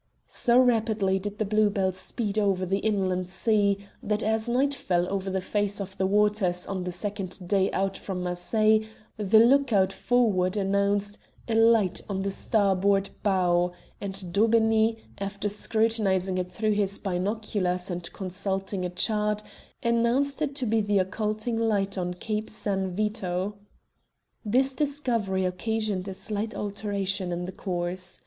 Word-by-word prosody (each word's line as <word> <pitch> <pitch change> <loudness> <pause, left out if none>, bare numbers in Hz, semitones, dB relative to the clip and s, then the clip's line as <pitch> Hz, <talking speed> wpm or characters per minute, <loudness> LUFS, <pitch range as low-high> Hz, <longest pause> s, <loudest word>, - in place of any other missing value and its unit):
So 240 0 +2
rapidly 220 -6 +3
did 205 +2 -5
the 215 - 0
Blue 215 +1 +3
Bell 195 -2 0
speed 205 +3 -2
over 195 -3 +1
the 195 +2 0
inland 190 -4 0
sea 200 0 +1 0.2
that 210 +1 -1
as 220 +2 +1
night 270 +4 +2
fell 180 -9 0
over 195 0 -2
the 190 0 -1
face 205 +1 -1
of 190 -1 -6
the 190 - +2
waters 205 -3 +2
on 190 -2 -4
the 180 - -2
second 195 -2 -4
day 195 0 +2
out 195 0 -1
from 185 -2 -4
Marseilles 215 +5 +2 0.3
the 210 0 +3
look 260 +4 +5
out 195 -2 +3
forrard 210 -7 +1
announced 200 +1 0 0.3
"a 230 - -1
light 225 -4 +4
on 190 -1 -2
the 195 - -1
starboard 195 -1 +2
bow," 180 -3 +2 0.3
and 195 -3 -5
Daubeney, 225 +1 +3 0.2
after 200 +1 -3
scrutinizing 205 -3 +1
it 180 0 -4
through 215 0 0
his 200 -1 0
binoculars 190 -1 -1
and 175 -1 -5
consulting 195 0 -3
a 180 - -1
chart, 210 +3 0 0.4
announced 240 +5 +1
it 285 -2 -1
to 265 -3 -2
be 225 0 +2
the 205 -1 +1
occulting 215 +4 -1
light 205 -3 +1
on 180 -1 -2
Cape 215 +3 -3
San 195 -3 -2
Vito. 195 -1 -2 0.9
This 260 +5 +2
discovery 245 -10 0
occasioned 205 +1 -2
a 190 - -5
slight 210 +2 -3
alteration 200 -2 -2
in 175 +1 -3
the 185 - -5
course. 180 -1 -3
200 Hz, 150 wpm, -27 LUFS, 190-220 Hz, 0.9 s, look